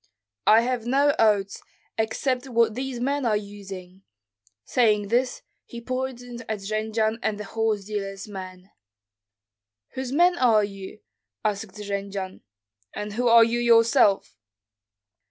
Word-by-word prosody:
"I 220 +2 +7
have 240 -1 -2
no 280 +3 +3
oats, 205 -3 +2 0.3
except 250 +4 -1
what 230 -2 +2
these 255 +1 -4
men 280 +3 -1
are 220 -3 +2
using." 195 -3 -9 0.6
Saying 210 -4 +2
this, 245 +3 0 0.2
he 235 - -9
pointed 245 -1 -5
at 215 -2 -3
Jendzian 220 +2 -1
and 210 -3 -2
the - - -4
horse 215 -1 -1
dealer's 195 -1 -5
men. 185 -1 -9 1.2
"Whose 260 -1 -5
men 350 +4 +3
are 225 -4 +4
you?" 195 0 -7 0.4
asked 205 -1 -2
Jendzian. 200 -2 -5 0.5
"And 210 0 -5
who 245 +3 0
are 230 0 +8
you 235 +1 0
yourself?" 230 - +4
220 Hz, 125 wpm, -25 LUFS, 200-245 Hz, 1.2 s, are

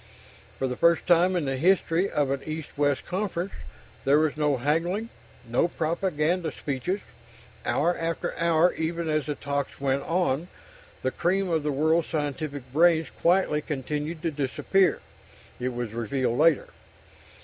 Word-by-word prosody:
For - - -1
the 125 - -3
first 170 +3 +3
time 175 +2 +4
in 170 -4 0
the 135 -1 -1
history 180 +3 +2
of 145 -2 0
an 140 0 -1
East 155 0 -6
West 145 -1 +1
conference, 185 -1 -2 0.5
there 140 +2 +4
was 155 -1 +2
no 150 -2 +1
haggling, 170 - 0 0.4
no 120 +8 +2
propaganda 170 0 -1
speeches. 150 +9 -3 0.7
Hour 175 +4 +2
after 165 0 -3
hour, 170 +1 +3
even 165 +1 -2
as 155 -1 0
the 150 - -2
talks 140 0 -3
went 140 0 +1
on, 170 -1 0 0.6
the 130 - +1
cream 185 +4 0
of 160 -1 +2
the 150 0 -1
world's 160 +4 +2
scientific 145 -2 -3
brains 165 +1 +4
quietly 170 -4 +3
continued 150 +3 -4
to 165 - 0
disappear, 150 +7 +1 0.6
it 125 +1 -1
was 120 -3 -4
revealed 120 +2 -1
later. 160 -2 +4
155 Hz, 150 wpm, -26 LUFS, 140-170 Hz, 0.7 s, time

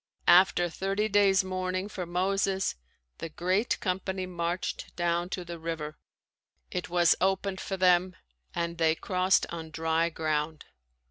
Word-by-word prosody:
After 175 -1 +6
thirty 195 +5 -1
days 200 -2 +4
mourning 185 0 -2
for 185 -4 -6
Moses, 190 +2 0 0.5
the 165 - -5
great 185 +8 0
company 190 0 -2
marched 175 0 -3
down 175 0 0
to 180 -2 -4
the 170 -1 -7
river; 160 -2 -5 0.7
it 180 0 -3
was 175 -1 +4
opened 190 0 0
for 195 - -4
them 180 0 +3 0.4
and 170 0 -2
they 160 -1 +3
crossed 185 +1 +2
on 165 -1 -6
dry 160 +1 0
ground. 155 -1 -2
180 Hz, 135 wpm, -29 LUFS, 170-190 Hz, 0.7 s, After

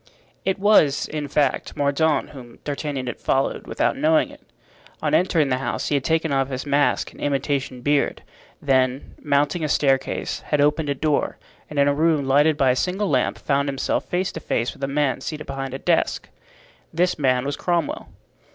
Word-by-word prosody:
It 190 - +1
was, 195 -9 +4
in 150 -1 -4
fact, 140 -1 0
Mordaunt 145 +2 +1
whom 125 -5 -12
D'Artagnan 145 -2 -3
had 120 - -5
followed, 135 +1 -1
without - - 0
knowing 310 +2 +2
it. - - -15 0.6
On - - -1
entering 165 -6 +3
the 130 0 0
house 135 - -2
he - - 0
had 140 -2 +1
taken 160 0 +1
off 135 0 +1
his 130 0 -4
mask 145 0 +1
and - - -15
imitation 140 -2 -1
beard, 145 +2 0 0.4
then, 130 -1 0
mounting 145 +3 +1
a 155 - -1
staircase, 135 -2 0
had 150 - -1
opened 150 +1 +2
a 140 - 0
door, 150 +1 0 0.3
and 150 - -8
in 140 0 +4
a 145 - +3
room 155 -1 +2
lighted 145 +3 +4
by 135 -3 +4
a - - +1
single 185 +7 -1
lamp 130 -2 +1
found 140 0 0
himself 135 -1 -1
face 185 +1 -1
to - - -6
face 120 -5 -1
with - - -12
a - - +1
man 140 -1 0
seated 155 -1 -5
behind 135 -1 -5
a - - -2
desk. - - 0 0.6
This 175 +1 0
man 130 -2 +2
was 140 0 -2
Cromwell. 170 -4 -2
145 Hz, 190 wpm, -23 LUFS, 135-155 Hz, 0.6 s, was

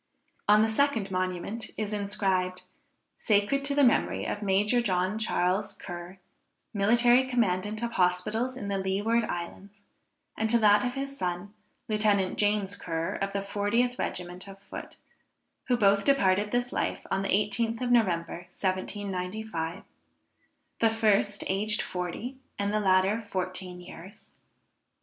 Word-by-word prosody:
On 210 +1 +6
the - - +3
second 225 -4 +1
monument 185 +4 -3
is 215 -1 -2
inscribed, 195 -3 -1 0.6
Sacred 210 +6 +2
to 280 0 0
the 285 - +4
memory 240 - +2
of 205 - -3
Major 210 +4 +2
John 190 -1 0
Charles 195 -1 0
Ker, 175 +1 -8 0.6
Military 240 +5 +4
Commandant 215 -3 0
of 235 - -1
Hospitals 210 +7 0
in 205 - -5
the 200 -1 -1
Leeward 205 +5 +1
Islands, 200 +3 -7 0.5
and 220 0 -1
to 235 - +5
that 210 -2 +5
of 250 +1 -2
his 275 0 -4
son, 180 -1 -3 0.3
Lieutenant 210 -3 +1
James 205 -1 +1
Ker, 165 +1 -3
of 195 0 -2
the 200 0 -2
40th 210 +5 0
regiment 180 +2 -4
of 195 0 -10
foot, 195 0 -10 0.7
who 250 -2 +2
both 200 -2 +4
departed 205 -7 +3
this 245 +2 -1
life - - -2
on 195 - +1
the 195 - -3
18th 225 +3 +1
of 245 -1 0
November 175 -6 +1
1795, 185 -2 -3 1.0
the 225 - +4
first 210 -2 +2
aged 210 +3 0
40 185 +9 -5 0.2
and 200 +1 -1
the 215 - +2
latter 195 +2 +3
14 185 -3 -4
years. 185 +3 -12
205 Hz, 140 wpm, -28 LUFS, 185-225 Hz, 1.0 s, On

